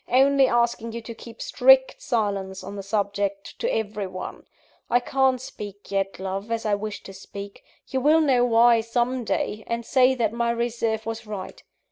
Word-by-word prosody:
only 270 +1 +5
asking 235 -1 +1
you 235 - -4
to 230 0 -8
keep 230 +1 -12
strict - - +4
silence 200 - -2
on 200 - -7
the 200 - -5
subject 200 0 -2
to 475 - 0
every 210 -2 -2
one. 185 0 -7 0.5
I 245 - +4
can't 260 +1 +1
speak 205 -7 -9
yet, 195 0 -1
love, 195 +3 -4
as 230 0 -2
I 210 - +1
wish 210 +1 -3
to 195 - -10
speak: 200 +1 -9 0.2
you 265 - -2
will 305 +4 +5
know 260 -5 +3
why, 235 -1 +5
some 240 +2 -1
day, 215 -1 -2
and 235 0 -3
say 260 0 +4
that 225 -3 0
my 235 0 0
reserve 235 -2 -1
was 225 -1 -5
right. 200 -3 -7
230 Hz, 180 wpm, -24 LUFS, 205-245 Hz, 0.5 s, only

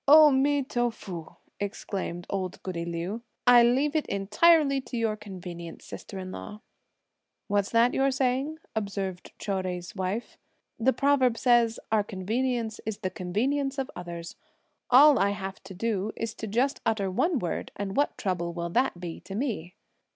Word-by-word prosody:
"O 300 +1 +9
mi 280 +1 +3
to 240 -2 0
fu!" 180 -7 -8 0.2
exclaimed 195 -3 -4
old 185 -2 -4
goody 170 -3 -3
Liu; 170 +6 -3 0.2
"I 245 -1 +8
leave 265 +6 +3
it 310 - +1
entirely 275 - +4
to 255 - -6
your 225 -2 +1
convenience, 180 -5 -8
sister 195 - -8
in 185 -1 -6
law." 210 +3 -8 0.9
"What's 200 +1 +1
that 235 +1 +4
you're 270 0 +3
saying?" 265 +3 0 0.2
observed 195 -3 -3
Chou 205 - -4
Jui's 180 +2 -5
wife. 190 +4 -3 0.4
"The 250 +4 +4
proverb 260 -2 +3
says: 240 -2 +3
'Our 215 -2 +3
convenience 225 +4 -2
is 215 -2 -3
the 185 -2 -2
convenience 270 +10 -1
of 270 -1 -2
others.' 170 -1 -7 0.5
All 280 +3 +8
I 200 - +3
have 195 -1 -6
to 190 -1 -9
do 215 0 -1
is 225 -1 -3
to 220 - -6
just 250 +7 0
utter 200 -4 0
one 325 - +1
word, 175 -8 -3
and 200 -1 -4
what 285 - +1
trouble 175 -4 -2
will 170 0 -3
that 255 -3 +1
be 175 -2 -6
to 195 - -8
me." 205 - -3
215 Hz, 165 wpm, -28 LUFS, 185-255 Hz, 0.9 s, O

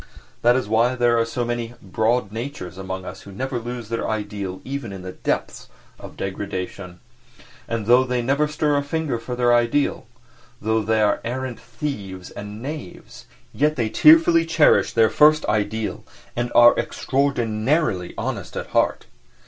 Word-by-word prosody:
That 120 +1 +5
is 130 -4 -1
why 115 +4 +2
there 120 -1 +3
are 115 - +2
so 120 +1 -3
many 120 0 -3
"broad 110 +3 0
natures" 115 - -6
among 95 0 -6
us - - -8
who 100 - -12
never 130 +5 -3
lose 120 -1 -6
their 115 - -2
ideal 105 -3 -4
even 135 -4 -5
in 95 -1 -8
the 95 - -6
depths - - -3 0.3
of - - -11
degradation; 95 -2 -5 0.7
and 115 -2 -3
though 120 +3 +6
they 125 -1 -1
never 140 +5 +1
stir 150 -1 0
a - - +2
finger 145 -4 -2
for 125 +2 -5
their 120 -1 +3
ideal, 120 +2 +1 0.5
though 110 +1 +1
they 110 0 +1
are 105 -1 +1
arrant 125 0 -4
thieves 105 -8 -6
and 105 +2 -8
knaves, 145 - -8 0.3
yet 150 +2 +1
they 115 -5 -1
tearfully 165 +6 +6
cherish 165 -2 +3
their 115 -1 +3
first 155 +1 +5
ideal 105 +1 -1 0.3
and 120 0 -2
are 120 0 +8
extraordinarily 120 - 0
honest - - -4
at - - -5
heart. - - +1
120 Hz, 160 wpm, -22 LUFS, 105-130 Hz, 0.7 s, are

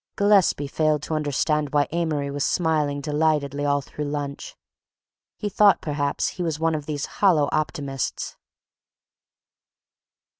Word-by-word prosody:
Gillespie 200 -7 +3
failed 150 +1 0
to 160 - -4
understand 150 0 0
why 145 -2 +3
Amory 155 -4 -1
was 140 0 -2
smiling 150 -4 0
delightedly 150 -1 0
all 145 0 +2
through 150 +2 -6
lunch. 145 -1 -5 0.8
He 210 - -3
thought 205 0 +4
perhaps 145 -2 -1
he 180 - -7
was 160 -3 -2
one 165 0 +1
of 150 -2 -4
these 150 -1 -2 0.2
hollow 165 -8 +4
optimists. 140 -4 -3
150 Hz, 125 wpm, -24 LUFS, 145-160 Hz, 0.8 s, thought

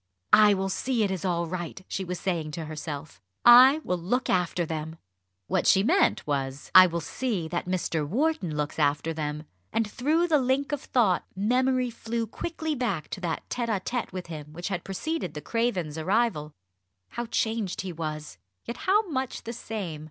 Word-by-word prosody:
"I 210 -1 +7
will 190 0 -1
see 245 +3 0
it 200 - 0
is 185 -3 -3
all 170 -2 0
right," 175 +2 -6
she 195 - -3
was 180 -1 -4
saying 170 -5 -2
to 160 0 -4
herself. 150 -2 -7 0.2
"I 255 +5 +9
will 180 -1 -1
look 245 +10 0
after 180 -1 +1
them." 160 0 -4 0.5
What - - 0
she 195 - +5
meant 355 - +2
was, 135 -1 -3
"I 185 0 +10
will 170 -1 -3
see 195 - -2
that 175 +1 -3
Mr. 175 -4 -1
Wharton 215 - 0
looks 150 +1 -3
after 145 +2 +1
them!" 150 -1 -4 0.3
and 225 -1 0
through 305 +10 +1
the 310 -3 +4
link 265 +2 0
of 290 -2 -2
thought, 215 -8 +1
memory 250 +4 +1
flew 230 0 -3
quickly 315 +7 -4
back 215 - -2
to 190 - -6
that 170 -3 -3
tête 240 -1 -2
à 215 -4 0
tête 240 +5 -3
with 185 -1 -5
him 150 -3 -8
which 175 +4 -5
had 180 -3 -3
preceded 195 - -3
the - - -3
Cravens' 185 -10 -1
arrival. 185 -4 0 0.6
How 240 0 -4
changed 220 -4 -1
he 185 -2 -5
was, 155 - -5 0.3
yet 235 - -5
how 405 - +2
much 265 -5 -3
the 235 0 -5
same! 200 -9 -5
190 Hz, 185 wpm, -27 LUFS, 160-240 Hz, 0.6 s, I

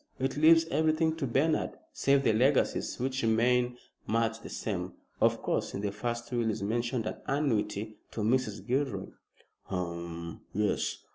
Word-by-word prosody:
It 135 0 -1
leaves 165 +2 +6
everything 160 0 +2
to 140 -4 -1
Bernard 145 +6 +1 0.2
save 140 0 +3
the 110 - +4
legacies, 130 +5 +2
which 130 +1 -1
remain 120 +2 +2 0.3
much 115 0 +1
the - - -9
same. 90 -4 -3 0.3
Of - - +3
course, - - -1
in 100 - -3
the 100 -1 -1
first 120 +3 -4
will 120 -2 +1
is 105 - -2
mentioned 115 +2 -1
an - - -3
annuity 110 -7 0
to 110 - -5
Mrs. 110 -1 0
Gilroy." 135 +2 -1 0.6
"Hum, 85 -2 -5
yes. 105 +1 0
120 Hz, 150 wpm, -30 LUFS, 105-135 Hz, 0.6 s, leaves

